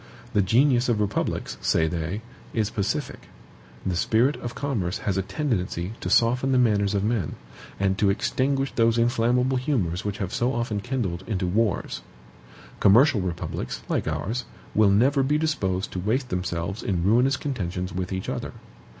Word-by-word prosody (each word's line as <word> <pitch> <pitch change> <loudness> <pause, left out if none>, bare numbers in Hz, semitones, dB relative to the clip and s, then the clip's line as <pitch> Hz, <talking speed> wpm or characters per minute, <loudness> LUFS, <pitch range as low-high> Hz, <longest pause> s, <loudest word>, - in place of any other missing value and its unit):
The 105 - +4
genius 120 +5 +3
of 115 -3 +2
republics 105 -1 -2
(say 80 - +2
they) 85 +6 -3 0.3
is 110 -3 0
pacific; 115 +8 -3 0.6
the 95 - 0
spirit 115 +10 +2
of 120 0 -6
commerce 110 -11 -2
has 100 - -2
a 95 - +1
tendency 95 - -2
to - - -4
soften 125 +3 +3
the 130 - +4
manners 105 -5 +2
of 100 - +1
men, 105 -7 -1 0.4
and 95 0 +1
to 100 - +4
extinguish 135 +6 0
those 115 0 +3
inflammable 125 +2 +2
humors 110 - -1
which 105 0 -3
have 95 -4 -4
so 125 +2 +1
often 115 -3 -1
kindled 100 -7 -3
into 100 -4 -1
wars. 105 +2 0 0.8
Commercial 120 +2 +5
republics, 85 -2 -4
like - - 0
ours, 120 +5 -2 0.3
will 110 -1 +5
never 130 +8 +4
be 145 +3 +2
disposed 100 -13 -1
to 95 - -4
waste 125 +7 0
themselves 90 +2 -3
in 90 -4 -1
ruinous 125 +7 +3
contentions 90 - -3
with 90 +1 -3
each 95 0 -3
other. - - -4
110 Hz, 160 wpm, -25 LUFS, 95-125 Hz, 0.8 s, Commercial